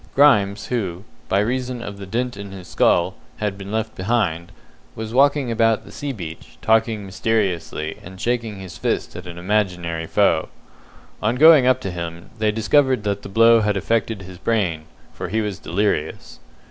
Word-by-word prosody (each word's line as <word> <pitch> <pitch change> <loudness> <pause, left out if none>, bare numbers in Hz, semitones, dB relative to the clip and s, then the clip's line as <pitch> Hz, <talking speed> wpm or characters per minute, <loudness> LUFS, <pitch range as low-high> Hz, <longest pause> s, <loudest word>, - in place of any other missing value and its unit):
Grimes, 105 -8 +4
who, 95 -7 -3 0.3
by 95 - +2
reason 125 +2 -2
of 100 -2 -7
the 100 - -8
dint 125 +5 -2
in 100 0 -8
his 95 -2 -10
skull, - - +2 0.2
had 105 -2 -2
been 100 0 -8
left 110 0 -2
behind, 95 -5 -1 0.4
was 110 0 -6
walking 140 -1 +3
about 115 -1 +2
the 100 - -12
sea 140 +8 -4
beach, 85 -9 -9
talking 110 -2 +2
mysteriously, 95 -6 -1
and 95 +1 -11
shaking 115 -3 -1
his 95 -2 -9
fist - - -1
at 90 0 -8
an 85 -1 -8
imaginary 90 -4 -1
foe. 90 -5 +2 0.7
On 110 +3 +1
going 150 -2 +7
up 130 0 +4
to 95 - -4
him, 85 -1 -6
they 110 -1 +2
discovered 125 +2 +2
that 100 -1 -1
the - - -9
blow 115 +2 +6
had 105 -1 +1
affected 110 0 -1
his 90 -1 -11
brain, 90 -9 0 0.3
for - - -5
he 110 +4 0
was 105 -4 -3
delirious. 85 -3 -2
105 Hz, 170 wpm, -21 LUFS, 95-115 Hz, 0.7 s, going